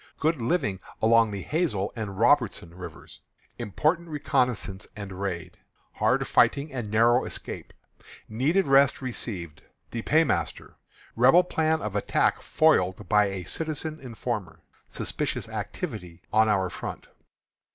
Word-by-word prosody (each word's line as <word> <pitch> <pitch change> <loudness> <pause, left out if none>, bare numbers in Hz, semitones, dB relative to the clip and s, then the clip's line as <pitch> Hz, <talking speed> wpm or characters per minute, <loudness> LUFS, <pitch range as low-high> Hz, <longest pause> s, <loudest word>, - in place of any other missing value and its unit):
Good 160 +2 +2
Living 115 - 0 0.2
Along 115 0 +5
the 100 -2 -5
Hazel 150 - -1
and 105 -4 -5
Robertson 115 - +2
Rivers. 85 -3 -10 0.4
Important 155 - 0
Reconnoissance 125 -9 -1
and 100 -2 -7
Raid. 90 -4 -4 0.3
Hard - - +1
Fighting 140 +1 +3
and 120 -5 -4
Narrow 115 +3 +4
Escape. - - -6 0.6
Needed 150 - +1
Rest 135 0 +4
Received. 95 -10 -5 0.3
The 115 - -3
Paymaster. 160 +7 +1 0.4
Rebel 130 +10 +6
Plan 160 -2 0
of 105 -1 -4
Attack 105 - +1
Foiled 105 - +2
by 105 0 +5
a 95 -2 -4
Citizen 155 - -3
Informer. 115 -6 -5 0.3
Suspicious - - -3
Activity 85 0 -6
on 110 0 +5
Our 95 -3 +1
Front. - - -6
115 Hz, 120 wpm, -26 LUFS, 100-145 Hz, 0.6 s, Rebel